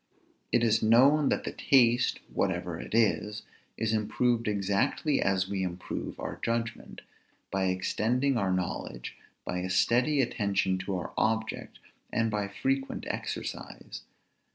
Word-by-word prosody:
It 120 - +3
is 115 -1 +3
known 135 +7 +5
that - - 0
the - - -3
taste 120 -3 +3
(whatever - - -1
it - - -5
is) 105 -2 +1 0.3
is 110 -1 0
improved 115 +2 +1
exactly 100 +8 +1
as 95 -1 +1
we 100 -1 -2
improve 90 -1 -4
our - - -5
judgment, 115 -1 -3 0.5
by 95 -1 0
extending 115 +8 +1
our 100 -5 +1
knowledge, 90 -9 -3 0.3
by 90 - -2
a 90 +1 -3
steady 125 +10 +3
attention 100 -6 +1
to 95 0 -3
our 90 - -6
object, 110 +2 -1 0.3
and 115 -1 +1
by 105 -1 -1
frequent 135 +6 -2
exercise. - - -5
110 Hz, 130 wpm, -29 LUFS, 95-120 Hz, 0.5 s, known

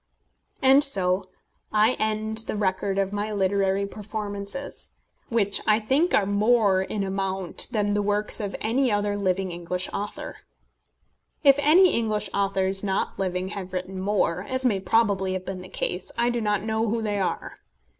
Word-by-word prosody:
] - - -36
And 270 +2 +6
so 185 -8 +2 0.4
I 215 +3 +4
end 215 0 -1
the - - -2
record 195 -1 -1
of 195 0 0
my 205 +1 -2
literary 195 0 +1
performances, 205 +4 -6 0.3
which 205 -4 +1
I 215 0 +4
think 270 +11 +2
are 200 - +3
more 205 -1 +3
in 200 +1 -3
amount 190 -1 +2
than 210 -4 0
the 205 - +1
works 205 +2 -1
of 205 -2 -4
any 245 +3 +1
other 205 0 0
living 190 -2 -1
English 175 +2 -4
author. 205 +1 -5 1.1
If 275 -1 +6
any 335 +6 +5
English 215 -3 -1
authors 195 -1 0
not 195 -1 -2
living 185 -1 -2
have 190 -2 -7
written 185 +1 -4
more 190 -3 0
as 260 0 0
may 210 -6 +2
probably 195 -2 +1
have 185 0 -4
been 185 0 -5
the 185 - -11
case 180 +1 -1
I 240 +1 +2
do 240 -1 -2
not 205 -2 0
know 220 +1 -1
who 225 +1 -1
they 205 -2 -1
are. 190 - -3
205 Hz, 165 wpm, -25 LUFS, 190-220 Hz, 1.1 s, And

